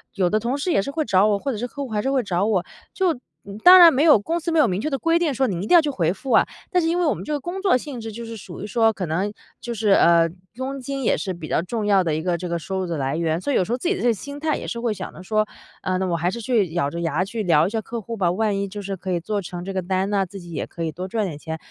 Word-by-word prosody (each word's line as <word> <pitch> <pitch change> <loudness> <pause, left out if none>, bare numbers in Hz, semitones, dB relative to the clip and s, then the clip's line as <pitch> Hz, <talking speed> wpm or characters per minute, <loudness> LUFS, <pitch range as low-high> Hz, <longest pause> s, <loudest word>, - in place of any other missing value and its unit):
有 185 -3 +2
的 215 - +2
同 240 +5 -1
事 320 +6 -1
也 195 - +3
是 275 - -5
会 310 +2 -1
找 190 +2 +4
我， 205 -1 +2
或 275 +6 -2
者 230 - -4
是 245 +4 -3
客 280 +4 -6
户 265 - -7
还 210 -2 -1
是 270 +3 -1
会 260 -3 +1
找 185 0 0
我。 200 -5 +1 0.3
就 355 -8 0 0.3
嗯， 200 +1 -8
当 365 +8 +9
然 335 -3 +9
没 275 - +2
有 310 -9 +7
公 330 +12 -2
司 335 +1 -3
没 325 - +2
有 285 - +5
明 190 +2 -1
确 305 - -1
的 275 - -1
规 330 0 +2
定， 335 -4 +1
说 265 +1 +1
你 180 -5 -2
一 210 - -4
定 - - +2
要 340 - +9
去 300 - -2
回 175 - 0
复 250 +7 -6
啊， - - +5 0.3
但 360 -3 +3
是 325 - +1
因 345 +2 +1
为 350 - +2
我 300 - +3
们 - - -7
这 305 - -6
个 295 - 0
工 350 +7 -5
作 380 -9 +4
性 255 -2 -7
质， 225 0 -6
就 235 +2 -7
是 230 0 -7
属 190 -4 -9
于 205 - -5
说 225 +1 +3
可 195 -4 -4
能 185 +6 -1 0.3
就 240 0 -4
是 215 -2 +1
呃， 170 -3 +5 0.3
佣 265 +2 -4
金 275 +1 -4
也 - - +2
是 190 - -3
比 170 -3 -8
较 155 - +1
重 215 +4 -3
要 195 -2 +4
的 165 -3 0
一 155 - -1
个 175 0 0
这 180 0 -5
个 170 - -1
收 190 +4 -4
入 - - -2
的 170 -2 -3
来 135 +1 -1
源， 165 0 0
所 280 +10 -2
以 - - +1
有 - - +3
时 205 - -6
候 245 - +1
自 300 - -3
己 390 - +2
的 - - -5
这 245 - +3
个 - - +3
心 280 +7 -8
态 310 -1 0
也 - - -7
是 - - -4 0.2
想 - - -7
着 185 - -11
说， 215 +2 +1 0.3
啊， 185 - -1
那 190 - -1
我 170 -2 0
还 175 +2 0
是 235 +5 -5
去 210 -8 +1
咬 155 -5 0
着 170 +3 -5
牙 165 +1 0
去 220 +3 -4
聊 165 -3 +4
一 - - -1
下 225 +1 -2
客 230 +2 -6
户 230 +2 -6
吧， 180 -3 +2
万 205 +2 0
一 200 - -2
就 205 +1 -7
是 195 0 -5
可 185 +1 -7
以 170 - -1
做 205 +3 -2
成 175 -1 -7
这 195 - -5
个 185 - -1
单 190 +2 -1
呢， 200 -2 +1
自 195 +1 -10
己 175 -1 -11
也 160 - -4
可 170 - -6
以 160 - -1
多 180 +5 -6
赚 215 +1 -1
点 160 -6 -5
钱。 160 +1 -5
205 Hz, 380 characters per minute, -23 LUFS, 180-260 Hz, 0.3 s, 当